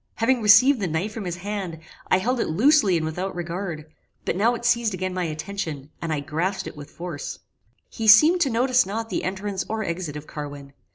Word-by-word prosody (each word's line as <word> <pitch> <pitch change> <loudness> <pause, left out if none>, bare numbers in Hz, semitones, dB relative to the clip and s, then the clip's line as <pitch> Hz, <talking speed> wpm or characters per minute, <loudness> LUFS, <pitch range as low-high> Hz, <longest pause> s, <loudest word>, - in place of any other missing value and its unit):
Having 240 +2 +2
received 220 +6 +6
the 195 - -1
knife 175 +7 -2
from 215 -3 -6
his 175 -1 -3
hand, 190 -2 -5 0.3
I - - +4
held 245 +6 0
it - - 0
loosely 210 - +4
and 160 - -2
without 180 +4 -4
regard; 170 -2 -4 0.4
but - - -1
now 225 +6 +2
it 240 - -7
seized 235 -4 +2
again 185 0 -3
my 180 -1 -1
attention, 155 -3 -5
and 165 -1 -3
I 150 -2 -1
grasped 165 +7 -2
it - - -7
with 145 0 -10
force. 170 -4 -6 0.5
He 225 - -5
seemed 310 +12 +7
to 280 - +3
notice 250 +2 +3
not 225 +2 -4
the - - -1
entrance 190 +1 -3
or 220 0 -2
exit 170 -4 -4
of 150 0 -7
Carwin. 145 -2 -8
190 Hz, 210 wpm, -24 LUFS, 165-225 Hz, 0.5 s, seemed